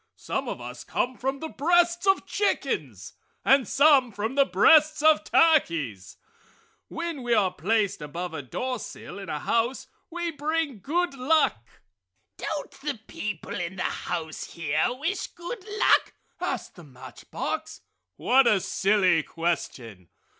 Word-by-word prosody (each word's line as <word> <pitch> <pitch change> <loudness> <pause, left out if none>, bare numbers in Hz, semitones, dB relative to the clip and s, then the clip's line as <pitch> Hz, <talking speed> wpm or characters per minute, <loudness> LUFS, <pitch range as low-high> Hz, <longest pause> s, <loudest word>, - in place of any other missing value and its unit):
Some - - -3
of - - -5
us - - -8
come 250 +1 -2
from 270 +2 -3
the 320 - -3
breasts 345 +4 +2
of 385 - +3
chickens 410 - -2 0.3
and 270 -2 +5
some 275 -4 +5
from 215 +4 -3
the 275 0 +3
breasts 305 - +5
of 315 -1 +5
turkeys. 155 - +2 0.7
When 330 -4 -5
we 240 -1 +1
are 190 -4 +2
placed 200 +3 0
above 170 +4 -5
a 150 - -4
doorsill 240 - -6
in 195 - -8
a 150 - -2
house, 235 - -1 0.2
we 345 0 -3
bring 300 -4 -2
good 340 - -1
luck!" 270 - +2 0.7
"Don't 300 -2 -4
the 285 -5 -3
people 210 -6 -5
in 175 +1 -4
the 185 - -3
house 160 -3 -4
here 155 -2 0
wish 305 +10 -3
good 370 +5 -8
luck?" 425 +1 +3 0.3
asked - - -3
the 175 - -11
match 130 -4 -13
box. - - -4 0.3
"What 255 - +4
a 210 -4 +4
silly 190 -3 +2
question!" 125 - -4
245 Hz, 140 wpm, -26 LUFS, -, 0.7 s, and